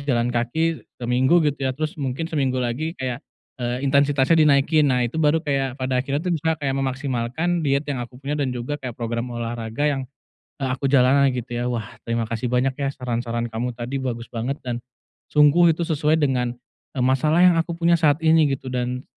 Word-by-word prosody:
di 140 - -9
jalan 120 -1 +1
kaki 160 +8 0 0.2
seminggu 130 +7 +2
gitu, 145 -1 -1
ya, 130 - -3
terus 155 +1 -2
mungkin 135 +3 -2
seminggu 140 -6 -1
lagi 130 +7 -2
kayak, 130 0 -3 0.4
eee, 125 +3 -2
intensitasnya 140 +3 +3
dinaikin, 150 +1 +4
nah, 125 -2 +2
itu 145 +7 -2
baru 155 +2 +2
kayak 135 -3 -1
pada 130 -1 0
akhirnya 140 +5 -2
tuh 180 - 0
bisa 160 0 0
kayak 140 -3 -2
memaksimalkan 135 +5 -1
diet 140 -1 +1
yang 140 -4 -3
aku 120 +1 -8
punya 140 +3 -5
dan 135 - 0
juga 125 +4 -4
kayak 125 -3 -6
program 115 +1 -3
olahraga 115 +3 -3
yang, 135 -1 -2 0.6
eee, 130 - 0
aku 135 +1 -1
jalani, 135 +1 +4
gitu 125 0 -5
ya. 120 +1 -2
Wah, 115 -4 -4
terima 115 0 0
kasih 115 +2 -3
banyak, 125 +2 +2
ya, 140 - 0
saran-saran 120 -2 -2
kamu 120 +1 -3
tadi 120 +3 -5
bagus 120 -3 -4
banget 120 +4 -2
dan 120 -1 -3 0.5
sungguh 155 +3 +5
itu 170 - -2
sesuai 155 -1 +1
dengan, 125 -5 0 0.4
eee, 125 - 0
masalah 150 +7 +3
yang 175 -2 +6
aku 165 0 -2
punya 170 0 +3
saat 155 0 +2
ini, 160 -1 +5
gitu, 130 -1 -9
dan 125 +1 -2
135 Hz, 195 wpm, -23 LUFS, 125-150 Hz, 0.6 s, yang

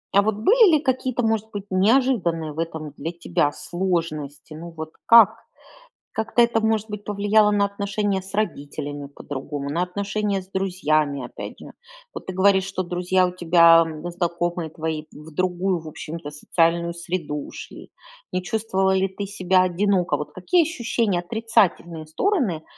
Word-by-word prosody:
А 200 - +7
вот 215 +1 0
были 400 - +5
ли - - +3
какие-то, 255 -3 -1
может 220 -1 0
быть, 205 -1 -6
неожиданные 185 - +2
в 155 - -8
этом 160 -2 -4
для 165 - -4
тебя 170 -3 0
сложности? 165 -5 -3
Ну 165 +2 -8
вот 160 -1 -8 0.2
как? 230 -3 +8 0.8
Как-то 225 +2 +1
это 235 -1 +3
может 220 0 0
быть 210 -1 -6
повлияло 210 +1 +3
на 205 -1 +3
отношения 200 0 -2
с 190 +1 -12
родителями 145 -7 -3
по-другому, 140 0 -6
на 170 +5 0
отношения 200 +2 -2
с 185 - -16
друзьями, 155 -8 0
опять - - -9
же. - - -11 0.4
Вот - - -8
ты 185 - -5
говоришь, 190 +1 +4
что 190 -1 -3
друзья 180 +1 +1
у - - -4
тебя, 170 -1 +6
м, 160 +1 -6
знакомые 175 -1 -2
твои 160 0 -4
в 150 +2 -12
другую, 185 +2 0
в 160 -1 -9
общем-то, 155 -1 -7
социальную 170 +3 +1
среду 170 -3 -4
ушли. - - -10 0.4
Не 185 - -1
чувствовала 190 -1 0
ли 190 0 +1
ты 200 +1 -5
себя 185 -2 +2
одиноко? 185 0 +1
Вот 150 - -5
какие 335 - +2
ощущения, 235 - -1
отрицательные 180 -5 0
стороны, 200 - 0
185 Hz, 160 wpm, -23 LUFS, 165-205 Hz, 0.8 s, как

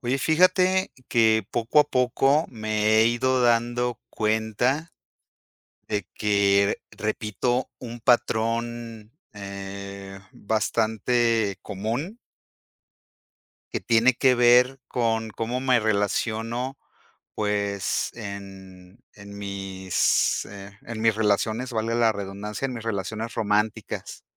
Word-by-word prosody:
Oye, 125 +2 -1
fíjate 185 +5 +3 0.2
que 110 -1 +3
poco 120 +5 +2
a - - +4
poco 135 +3 +2
me 110 -1 0
he 110 - +6
ido 125 +2 +1
dando 120 0 +1
cuenta 110 +8 0 1.0
de 105 -3 -2
que, 100 -1 +2
repito, 110 +4 -2
un 120 -1 -8
patrón, 115 -1 0 0.2
eh, 100 -1 -8
bastante 110 0 0
común. 115 - -4 1.6
Que - - -1
tiene 115 +2 +3
que 130 0 +4
ver 125 +2 +5
con 115 -2 0
cómo 115 +4 -3
me 130 -2 +3
relaciono, 110 +4 -1 0.6
pues, 100 -2 -1
en, 95 -2 -10
en 100 0 -11
mis, 95 -2 0
eh, 100 0 -11
en 115 -1 -7
mis 115 0 +4
relaciones, 110 +3 0
valga 115 +1 -1
la 115 -2 +4
redundancia 100 +4 -5
en 130 - -5
mis 115 -2 -7
relaciones 110 +2 -3
románticas. 105 0 -2
110 Hz, 105 wpm, -25 LUFS, 100-120 Hz, 1.6 s, he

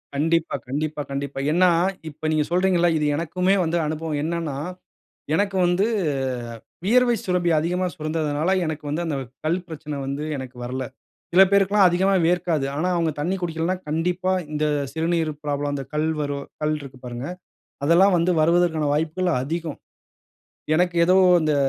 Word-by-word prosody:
கண்டிப்பா, 165 +3 +1
கண்டிப்பா, 150 +3 -2
கண்டிப்பா. 140 0 -4
ஏனா, 180 +3 +5 0.4
இப்ப 155 +1 -6
நீங்க 155 -1 +2
சொல்கிறீங்கள 185 +1 +3
இல்ல. 175 0 +4
இது 150 - 0
எனக்குமே 180 +5 +1
வந்து 165 +1 0
அனுபவம். 155 0 -3
என்னனா, 165 -3 -2 0.8
எனக்கு 195 +2 +1
வந்து 175 +4 +2 0.7
அ - - -8 0.3
வியர்வை 240 +3 +4
சுரப்பி 180 -2 +1
அதிகமா 180 +4 0
சுரந்ததனால. 155 +1 -1 0.2
எனக்கு 155 -1 -4
வந்து 165 +4 -1
அந்த 155 -3 -1
வெ 135 - -5 0.2
கல் 170 +4 +1
பிரச்சன 150 -3 -6
வந்து 140 +2 -3
எனக்கு 130 -1 -8
வரல. 130 +2 -3 0.5
சில 185 +2 +8
பேருக்கு 200 0 +3
எல்லாம் 195 -3 +7
அதிகமா 190 +3 +2
வியர்க்காது. 170 -4 +1
ஆனா, 170 +5 0
அவங்க 165 -2 +1
தண்ணீ 180 +6 0
குடிக்கலனா, 165 +2 -1
கண்டிப்பா 180 +4 0 0.2
இந்த 150 0 0 0.3
சிறுநீர் 165 0 0
ப்ராப்ளம் 145 0 -1
அந்த 135 - -4
கல் 155 +1 0
வரும் 140 -1 -3 0.2
கல்ருக்கு 145 -4 -3
பாருங்க. 120 +2 -5 0.6
அதெல்லாம் 180 +5 +5
வந்து 170 +2 +2
வருவதற்கான 160 -1 +2
வாய்ப்புகள் 165 +4 0
அதிகம். 160 +1 -4 1.0
எனக்கு 175 +1 +2
ஏதோ 185 +2 +5 0.2
அ - - +6
இந்த 155 -1 +2
160 Hz, 155 wpm, -23 LUFS, 150-180 Hz, 1.0 s, சில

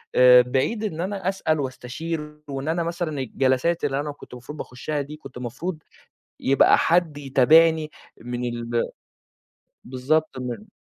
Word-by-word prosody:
آآ 125 0 +8
بِعيد 130 - -1
إن 170 -6 -3
أنا 190 0 -2
أسأل 160 -5 0
وأستشير 150 +4 -5
وإن 135 +1 -4
أنا 170 +1 0
مثلًا 165 -3 -3
الجلسات 130 +6 0
اللي 140 -1 0
أنا 145 +1 -3
كُنت 145 - -14
المفروض 125 +5 -9
باخُشّها 145 +4 -4
دي 145 +2 -7
كُنت 150 - -12
المفروض 130 +9 -4 0.6
يبقى 135 +1 +5
حد 165 -3 +2
يتابعني، 155 +3 +4 0.3
من 125 0 -3
ال 120 0 -1 1.0
بالضبط 135 +4 -1
من 130 - -6
145 Hz, 140 wpm, -24 LUFS, 125-165 Hz, 1.0 s, آآ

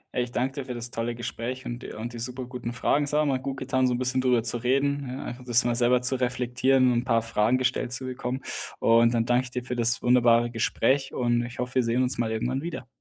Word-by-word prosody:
Ey, 125 - +2
ich 120 - -7
danke 130 +2 -1
dir - - -8
für 125 - -5
das 120 0 -5
tolle 115 +1 -2
Gespräch 120 +2 -5
und 120 0 -5
de - - -7
die 120 -1 -9
superguten 125 0 -5
Fragen. 140 +4 +1
Es 145 - -3
hat 150 0 +2
mal 135 -2 +1
gutgetan, 130 0 -1
so 125 - +2
'n - - -1
bisschen 130 +1 0
drüber 125 -3 +2
zu 120 - 0
reden 140 +4 0
ja 130 +2 -5
einfach 120 +1 -7
das 120 -1 +3
mal 120 -1 +1
selber 125 +1 +3
zu 125 +1 0
reflektieren 125 +1 +2
und 120 - +2
'n - - -4
paar 115 -2 +2
Fragen 115 +2 +1
gestellt 125 -1 -1
zu 125 +1 -2
bekommen. 130 0 -4 0.4
Und 115 +1 +4
dann 115 -1 +1
danke 125 +1 +2
ich 125 - -9
dir 125 -1 -4
für 125 - -3
das 115 -3 +1
wunderbare 120 -1 +4
Gespräch 135 +4 0
und 120 -1 +1
ich 120 0 -8
hoffe, 125 0 -4
wir 130 - +4
sehen 115 +2 +1
uns 130 0 0
mal 115 -2 -1
irgendwann 125 +4 -1
wieder. 160 -8 -6
125 Hz, 255 wpm, -26 LUFS, 120-130 Hz, 0.4 s, Und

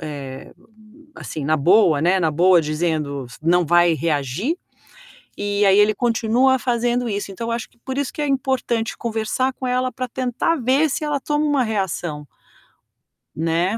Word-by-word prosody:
eh, 140 -4 -8 0.6
assim 155 - -6
na 155 +2 +2
boa, 170 0 +4
né, 180 +3 +3
na 160 -3 +2
boa 175 +3 +4
dizendo 155 -3 -2
s 115 - -14
"Não 175 +2 +3
vai 175 +1 +4
reagir". 160 - -1 0.8
E 205 0 0
aí 195 0 +5
ele 210 +1 +4
continua 245 +2 +2
fazendo 240 0 0
isso, 200 -1 -3
então 230 +4 -5
eu - - -1
acho 230 -1 -4
que - - -32
por 265 0 -4
isso 285 - -2
que 300 - -4
é 295 - 0
importante 260 -4 -1
conversar 230 +3 -1
com 260 - -6
ela 255 0 0
para 255 -1 -4
tentar 255 +6 -1
ver 270 +4 +2
se 305 - -2
ela 295 -2 -1
toma 295 +2 -1
uma 285 -3 +2
reação 175 -8 -3 1.1
Né. 165 +6 0
215 Hz, 170 wpm, -21 LUFS, 165-255 Hz, 1.1 s, aí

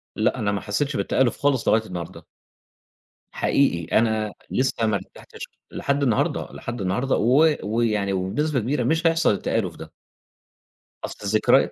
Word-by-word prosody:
لأ، - - +1
أنا 100 -1 0
ما 100 - -2
حسّيتش 140 +7 -2
بالتآلف 130 -3 +1
خالص 140 -3 +1
لغاية 110 0 +3
النهارده. 90 -4 -7 1.1
حقيقي 85 - +1
أنا 110 -2 +1 0.2
لسّه 125 -3 0
ما 110 - +1
ارتحتش - - -8 0.2
لحد 140 0 -1
النهارده، 115 -6 0
لحد 120 -2 -6
النهارده 100 +9 0
و 145 +7 +4
ويعني 105 -2 0
وبنسبة 130 +11 -1
كبيرة 125 +3 -1
مش 160 +7 +2
هيحصل 165 -4 +3
التآلف 100 - -2
ده. - - -11 1.1
أصل - - -8
الذكريا... 110 +1 +3
115 Hz, 140 wpm, -23 LUFS, 105-140 Hz, 1.1 s, و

